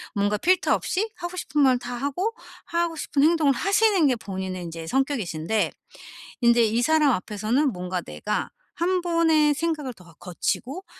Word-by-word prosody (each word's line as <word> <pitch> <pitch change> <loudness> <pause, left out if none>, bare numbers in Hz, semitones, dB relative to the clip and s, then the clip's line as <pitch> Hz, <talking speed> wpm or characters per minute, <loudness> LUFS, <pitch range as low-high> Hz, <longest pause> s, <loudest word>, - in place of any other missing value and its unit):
뭔가 205 +1 +1
필터 365 - +2
없이 425 +4 -2
하고 350 +1 -6
싶은 300 -4 -1
말 255 -2 +4
다 245 0 -6
하고 285 - -2 0.3
하고 340 -1 -1
싶은 285 -2 0
행동을 310 -3 +4
하시는 395 - +3
게 260 - +2
본인의 190 -3 -5
인제 165 -1 -7
성격이신데 220 - -1 0.7
인제 235 0 +5
이 225 +2 +1
사람 305 0 +4
앞에서는 220 +7 0
뭔가 180 0 -3
내가 210 +4 -3 0.3
1 360 +2 0
번의 325 -4 +3
생각을 305 -4 -2
더 185 -5 -18
어 - - -17
거치고 250 - -3
270 Hz, 315 characters per minute, -24 LUFS, 210-335 Hz, 0.7 s, 인제